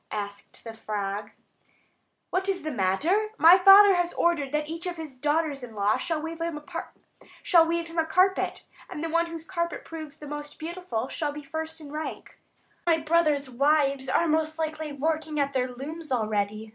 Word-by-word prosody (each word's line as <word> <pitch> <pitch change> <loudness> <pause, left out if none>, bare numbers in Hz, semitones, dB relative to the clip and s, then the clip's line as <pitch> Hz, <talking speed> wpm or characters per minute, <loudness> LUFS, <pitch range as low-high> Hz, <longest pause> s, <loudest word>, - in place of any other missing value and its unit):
asked 205 -1 -6
the 225 - -7
frog. 205 -2 -4 1.0
"What 380 +1 0
is 380 -4 -1
the 310 - -3
matter? 295 - +1
My 345 +3 +8
father 395 +1 +9
has 350 -1 0
ordered 300 -6 +1
that 300 0 -1
each 330 +3 -4
of 350 -1 -4
his 310 -5 -7
daughters 295 +1 0
in 235 -3 -9
law 205 +1 +2
shall 330 -2 -2
weave 325 +1 -6
him 335 -2 -2
a - - -8
carpet, - - -7 1.9
and 300 - -6
the 330 - -2
one 335 +1 +1
whose 330 -1 -7
carpet 340 -1 -3
proves 315 -3 -8
the 300 - -10
most 295 0 -7
beautiful 320 -8 -4
shall 300 +1 -2
be 295 +1 -8
first 320 +2 -5
in 295 -2 -10
rank. 310 +1 -6 0.4
My 335 -2 +3
brothers' 305 -3 +2
wives 275 +1 +1
are 335 - +2
most 315 0 0
likely 315 -1 -3
working 310 +1 -2
at 280 0 0
their 255 -1 +1
looms 300 +5 -7
already. 215 -2 -1
305 Hz, 170 wpm, -27 LUFS, 265-330 Hz, 1.9 s, father